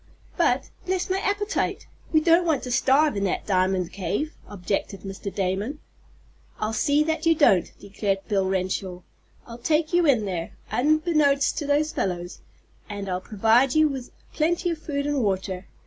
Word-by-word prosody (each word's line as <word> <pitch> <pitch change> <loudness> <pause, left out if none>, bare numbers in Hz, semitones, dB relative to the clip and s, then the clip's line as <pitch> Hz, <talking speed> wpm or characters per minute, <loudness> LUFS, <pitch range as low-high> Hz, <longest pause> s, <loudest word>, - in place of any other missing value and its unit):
"But, - - +1 0.2
bless 370 0 -1
my 380 - +1
appetite, 410 +3 -1 0.3
we 310 - +4
don't 335 +2 +4
want 320 -4 0
to 250 - -5
starve 280 +3 +3
in 200 - -1
that 190 - -2
diamond 185 -2 +1
cave!" 200 - -2
objected 195 0 -3
Mr. 195 0 -6
Damon. 195 +9 -2 0.8
"I'll 215 +1 -2
see 290 +5 +2
that 320 +1 -1
you 330 - +5
don't," 195 - +4
declared 195 -1 -3
Bill 195 -3 +1
Renshaw. 185 -1 -2 0.4
"I'll 235 0 -10
take 310 +5 0
you 350 -2 +4
in 240 -7 +3
there, 175 -4 -4 0.2
unbeknownst 300 -1 +2
to 295 - -4
those 295 +2 +2
fellows, 175 -2 -3 0.5
and 200 -1 -5
I'll 185 -1 -2
provide 225 +7 +2
you 310 -1 +5
with 265 -3 -6 0.2
plenty 345 +3 0
of 325 - -4
food 280 -2 -3
and 290 -2 0
water. 190 -2 -2
245 Hz, 165 wpm, -25 LUFS, 195-310 Hz, 0.8 s, you